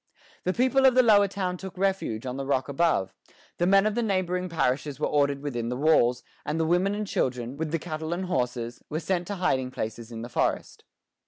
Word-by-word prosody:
The 185 - +1
people 260 +3 +4
of 255 - +4
the 255 - +6
Lower 205 -3 +6
Town 185 -2 -3
took 190 0 -9
refuge 190 - -1
on 125 0 -3
the 135 - -3
rock 130 -2 +1
above; 140 - +1 0.5
the 175 - +2
men 195 +1 +5
of 215 - +1
the 240 - 0
neighboring 185 -4 -1
parishes 145 -3 -1
were - - +1
ordered 140 -1 +1
within 120 -5 -3
the 125 - -3
walls; 125 -5 +3 0.2
and 150 +2 -2
the 160 - +2
women 180 +5 +2
and 210 0 -2
children, 125 - -2
with 155 +1 -3
the 165 - 0
cattle 160 -1 -5
and 180 +2 -2
horses, 125 -7 -2
were 155 - -2
sent 175 0 -1
to 205 - -3
hiding 155 -9 0
places 115 -1 -5
in 115 0 -6
the - - -5
forest. - - -2
160 Hz, 220 wpm, -27 LUFS, 130-190 Hz, 0.5 s, the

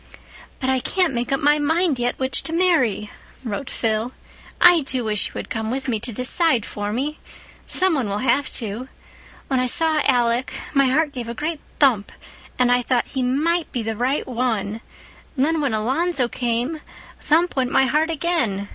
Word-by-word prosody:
"But 260 - -2
I 260 0 +2
can't 360 +3 0
make 240 +2 -2
up 275 - +1
my 295 +1 +3
mind 320 -1 +1
yet 245 0 -1
which 260 0 -1
to 325 - -5
marry," 285 - +2 0.3
wrote 240 +3 -4
Phil. 225 +2 -1 0.5
"I 355 -2 +7
do 260 -3 -3
wish 215 -2 0
you - - -13
had - - -6
come 220 -1 -2
with 265 +3 -3
me 230 -4 0
to 240 +3 -3
decide 250 - +2
for 205 0 -4
me. 285 +7 -3 0.5
Some 375 -1 +3
one 260 -9 -1
will 200 - -1
have 265 +4 +1
to. 230 +3 -4 0.6
When 265 -2 +1
I 255 - +1
saw 315 +2 +3
Alec 245 -1 +1 0.2
my 275 -2 +4
heart 295 +3 +2
gave 245 -4 -6
a 235 - -5
great 310 +3 -3 0.2
thump 245 -8 +3 0.5
and 250 -1 +3
I 245 0 +3
thought, 245 -1 0
'He 265 - -3
might 310 +7 0
be 240 - -3
the 220 0 -3
right 255 +6 0
one.' 225 -4 -2 0.6
And 260 - +3
then, 320 0 0
when 270 -6 0
Alonzo 260 +5 +1
came, 245 +6 -2 0.4
thump 335 +4 +2
went 255 -2 +1
my 265 - +3
heart 305 +4 +1
again. 280 - -1
260 Hz, 190 wpm, -22 LUFS, 235-300 Hz, 0.6 s, I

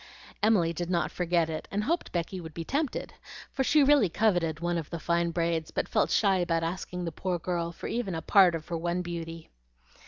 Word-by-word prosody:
Emily 195 -6 +3
did 175 +1 -4
not 175 -2 0
forget 175 -2 +1
it, 155 -1 -5
and 205 +1 -1
hoped 335 +9 -1
Becky 180 +2 -3
would 160 -2 -10
be 165 - -4
tempted, 285 - -2 0.4
for 270 - 0
she 295 +2 +4
really 275 -8 +5
coveted 170 -5 +1
one 175 0 0
of 155 - -7
the 170 - -4
fine 170 +1 +1
braids, 165 -1 -1
but - - -2
felt - - +1
shy 195 -3 +3
about 170 -2 0
asking 180 +1 -4
the 165 - -3
poor 180 +2 -2
girl 170 0 -2
for - - -10
even 225 -7 -2
a 160 - -3
part 185 -4 +5
of 160 -1 -6
her 170 - -1
one 175 +2 -1
beauty. 165 -1 -6
175 Hz, 215 wpm, -28 LUFS, 165-190 Hz, 0.4 s, really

